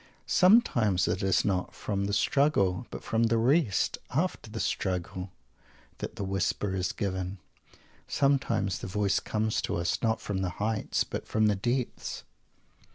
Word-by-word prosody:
Sometimes 120 - +4
it 90 +2 0
is 95 -2 +2
not 95 -3 -1
from 100 -1 -2
the 100 - -2
"struggle," 120 -5 +2
but - - -8
from 115 +1 +1
the 115 0 +2
"rest" 120 - +2
after 155 -4 -1
the 110 +1 -6
struggle, 90 -1 -2 0.7
that - - -5
the - - -4
whisper 95 +1 -1
is 90 -1 -1
given. 95 -1 -3 0.7
Sometimes 135 -9 +1
the - - -6
voice 100 +1 +1
comes 110 0 -1
to - - -2
us, 85 0 -1
not 110 0 +1
from 100 -2 -3
the 95 -1 -1
"heights," 110 0 0
but - - -6
from 110 0 +2
the 105 -1 +3
depths. 120 +5 -2
105 Hz, 155 wpm, -29 LUFS, 95-115 Hz, 0.7 s, Sometimes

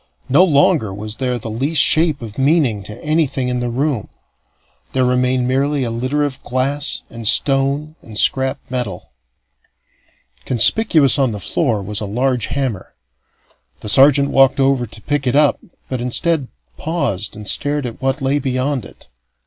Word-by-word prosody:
No 145 +8 +5
longer 150 - +2
was 105 +2 -7
there 125 -2 -1
the 110 -1 -7
least 140 +8 -1
shape 155 -2 +3
of 110 +1 -8
meaning 135 -7 +2
to 105 +4 -10
anything 150 -5 0
in 125 0 -1
the 120 0 -2
room; 130 -2 -2 0.8
there 130 -1 +2
remained 125 0 +1
merely 135 +2 0
a 120 - -2
litter 130 +6 -1
of 140 -3 -4
glass 135 +4 -2
and 115 -2 -5
stone 140 +5 +2
and 110 -2 -10
scrap 130 +4 +2
metal. 120 -9 -5 1.3
Conspicuous 140 - +3
on 130 -5 +1
the 105 - -5
floor 110 - -1
was 105 +2 -4
a 105 - -3
large 125 +2 0
hammer. 130 -9 -4 0.9
The 105 - -5
sergeant 140 +4 +5
walked 135 0 +4
over 135 -2 +2
to 110 0 -13
pick 145 0 -1
it 125 - +1
up, 145 -1 +3 0.3
but, 130 -2 -4
instead, 140 +3 0 0.3
paused 150 - -2
and 105 -1 -9
stared 145 +6 0
at 120 +1 -7
what 135 +1 -1
lay 135 +2 +1
beyond 130 -1 -2
it. - - -15
130 Hz, 160 wpm, -18 LUFS, 120-145 Hz, 1.3 s, No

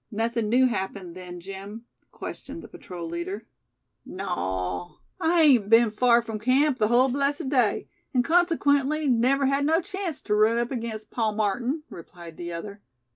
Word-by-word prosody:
"Nothing 225 0 -1
new 255 +3 +4
happened, 190 -6 -3
then, 180 -1 -9
Jim?" 195 +5 -9 0.3
questioned - - -8
the - - -10
patrol 175 -2 -8
leader. 175 +6 -5 0.6
"Naw. 95 - -4 0.2
I 335 -1 +3
hain't 245 -9 +5
been 230 0 +6
far 235 +2 +4
from 220 -2 -5
camp 260 +4 +2
the 215 - +3
hull 245 +3 +4
blessed 280 +1 -1
day; 250 -6 +1 0.2
an' 250 -4 +2
consequently 305 -3 +2
never 260 +3 +3
had 275 +1 +1
no 320 +3 +3
chanct 380 -3 -5
tew 210 - 0
run 215 +2 +4
up 235 +2 -1
against 225 -4 -5
Pa 225 -3 0
Martin," 235 +8 -1
replied 170 -1 -11
the 175 0 -6
other. 200 +4 -7
235 Hz, 160 wpm, -26 LUFS, 200-275 Hz, 0.6 s, been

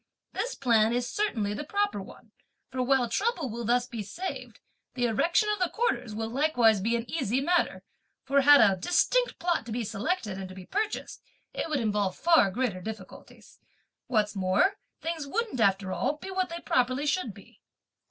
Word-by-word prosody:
This - - -2
plan 230 -3 +3
is 245 0 0
certainly 225 - -1
the 210 - -4
proper 405 +6 -1
one, - - -14 0.4
for 255 - -2
while 255 -1 +2
trouble 335 - -1
will 235 +1 -5
thus 240 +2 +2
be 235 -3 -6
saved, 345 - -6 0.4
the 245 -1 +1
erection 335 - +2
of 420 -1 0
the 365 -2 +1
quarters 250 - -1
will 225 +1 -2
likewise 240 -5 +3
be 230 +4 +1
an 235 0 -3
easy 260 -4 -1
matter; 345 +5 +1 0.4
for 275 +1 +3
had 290 +1 +8
a 195 -3 +5
distinct 420 - +1
plot 345 -4 0
to - - -6
be 235 +2 -2
selected 215 - -2
and 190 -1 -6
to 185 - -10
be 185 -1 -10
purchased, 425 - -3 0.3
it - - -3
would 300 -3 0
involve 210 -4 0
far 330 -12 +4
greater 200 -3 -2
difficulties. 210 -1 -10 0.5
What's 215 -3 +1
more, 195 - +2 0.2
things 325 -3 -3
wouldn't, 435 - -2
after 195 -3 +2
all, - - 0
be 385 - -8
what 375 -1 -1
they 340 0 -6
properly 255 +3 +1
should 300 -5 0
be. 200 - -17
250 Hz, 180 wpm, -28 LUFS, 215-340 Hz, 0.5 s, had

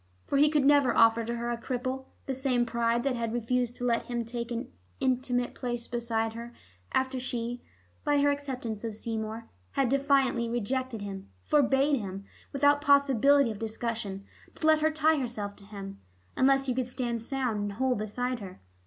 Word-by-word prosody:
For 280 - +1
he 295 +1 +6
could 295 -3 +2
never 285 -2 +4
offer 230 0 +5
to 235 +1 -3
her 235 0 -2
a 235 -1 -4
cripple; 255 +1 -3 0.2
the 270 - -2
same 255 -2 +1
pride 235 0 0
that 270 -2 0
had 230 -1 -2
refused 240 +1 0
to 245 - -6
let 235 -1 +1
him 240 -1 -2
take 235 0 -5
an 235 -1 -4 0.3
intimate 250 -1 0
place 240 -2 -3
beside 230 -2 -1
her 235 +1 -8 0.4
after 260 0 0
she, 245 -1 -3 0.4
by 290 -1 +3
her 285 0 +4
acceptance 255 -7 -4
of 225 -2 -4
Seymour, 220 0 -4 0.3
had 270 -3 +2
definitely 270 -3 +2
rejected 240 0 -2
him, 195 - -7
forbade 280 0 +3
him, 195 -1 -6 0.3
without 285 +1 +3
possibility 280 -2 +4
of 210 - -7
discussion, 220 -3 -4 0.3
to - - -4
let 315 -1 +5
her 315 - +4
tie 315 0 +3
herself 215 -6 -4
to 200 - -14
him, 195 -1 -8 0.4
unless 270 +1 +4
he 255 - 0
could 250 0 -1
stand 245 -2 -2
sound 250 -3 -1
and 205 0 -2
whole 260 +4 +1
beside 245 +3 -2
her. 190 - -9
245 Hz, 180 wpm, -29 LUFS, 230-270 Hz, 0.4 s, he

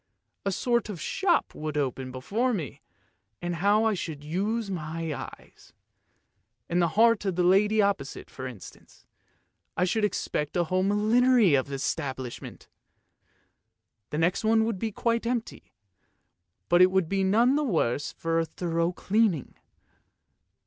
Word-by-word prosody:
A - - +2
sort 235 +2 0
of 195 -5 -6
shop 360 - 0
would 155 -1 -4
open 130 -2 -2
before 215 - -1
me, 155 - -6 0.6
and 175 -1 -3
how 205 +5 +3
I 220 -1 +2
should 160 -6 -5
use 200 +7 -2
my 165 -2 -4
eyes! - - -11 0.9
In 175 - 0
the 170 - +3
heart 230 -1 +5
of 190 -3 -1
that 180 - +1
lady 205 +4 +4
opposite, 200 -9 -2
for 130 -1 -7
instance, 120 -7 -13 0.7
I 180 - +3
should 215 +4 0
expect 150 -6 -1
a 175 - +3
whole 185 +3 0
millinery 215 - +4
establishment! 135 -1 -3 1.4
The 150 - -4
next 175 +7 +1
one 220 0 +3
would 225 -4 -2
be 220 +2 -2
quite 230 +2 -1
empty, 240 -2 -4 1.0
but 175 +1 +4
it 185 - +7
would 190 -3 +1
be 195 +2 0
none 230 +7 +3
the 300 - +1
worse 150 - 0
for 165 0 -1
a 165 - 0
thorough 170 0 -1
cleaning. 195 - 0
185 Hz, 140 wpm, -27 LUFS, 160-220 Hz, 1.4 s, it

